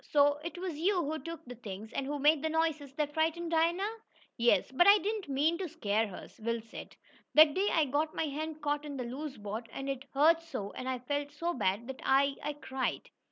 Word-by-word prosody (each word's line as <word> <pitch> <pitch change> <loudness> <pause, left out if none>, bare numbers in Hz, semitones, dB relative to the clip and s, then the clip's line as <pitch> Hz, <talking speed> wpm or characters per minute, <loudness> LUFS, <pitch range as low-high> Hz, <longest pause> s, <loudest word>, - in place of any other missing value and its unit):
"So 290 0 +4
it 335 0 -5
was 350 -4 -4
you 360 +1 +2
who 315 +2 -2
took 330 -1 -8
the 245 - -8
things, 215 -2 -8
and 270 - -2
who 290 +1 -2
made 295 +1 +4
the 315 - 0
noises 315 -3 0
that 295 -1 -1
frightened 325 +2 0
Dinah?" 345 +7 +1 0.4
"Yes, 235 +2 +3
but 350 +8 +4
I 405 +1 +9
didn't 415 -3 -3
mean, 300 +5 +2
to 370 -3 -3
scare 215 -2 0
her," 190 - -9
Will 230 +1 -1
said. 225 0 -10 0.4
"That 305 -1 +8
day 390 +5 +1
I 320 -2 +3
got 295 +3 -1
my - - 0
hand 310 +1 -5
caught 295 0 0
in 290 -2 -6
the 250 - -2
loose 270 +4 -6
board, 215 +2 -6
and 270 - -5
it 275 0 -3
hurt 325 +4 +5
so, 210 -12 -5
and 255 - -5
I 260 - -1
felt 285 +3 -3
so 335 +4 -2
bad 200 - 0
that 265 -1 -7
I 275 +1 +3
I 300 - -2
cried. 265 -2 -3
290 Hz, 225 wpm, -31 LUFS, 260-325 Hz, 0.4 s, I